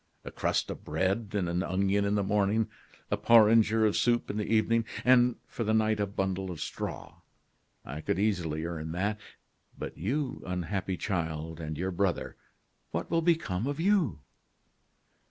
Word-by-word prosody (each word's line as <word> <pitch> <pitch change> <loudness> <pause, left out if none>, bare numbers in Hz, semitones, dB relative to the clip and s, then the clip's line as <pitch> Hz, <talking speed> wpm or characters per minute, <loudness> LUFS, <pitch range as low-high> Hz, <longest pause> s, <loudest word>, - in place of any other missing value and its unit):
A - - -6
crust - - 0
of - - -8
bread 95 +7 -1
and 100 -4 0
an 85 +1 0
onion 100 +2 +1
in 100 +1 +1
the 100 - +1
morning, 105 +2 +1 0.4
a - - +2
porringer 110 -1 +5
of 105 - +2
soup 120 -1 +2
in 105 - -5
the 105 - -2
evening, 115 +1 +3 0.2
and 125 -1 +5
for 115 - -4
the 110 0 +1
night 110 -1 +2
a 100 - +1
bundle 95 -1 -2
of 85 -4 -6
straw. - - -5 0.7
I 75 +4 -6
could - - -1
easily 85 -6 0
earn 80 -2 -4
that. 100 +4 -1 0.6
But - - -6
you, 130 - -2
unhappy 90 +1 -2
child! 80 -4 -3
and 80 -2 -5
your 95 +3 -2
brother, 95 0 -1 0.5
what 85 - -4
will 165 0 +3
become 160 - +1
of 145 +1 -3
you?" 170 - +2
100 Hz, 165 wpm, -29 LUFS, 90-110 Hz, 0.7 s, porringer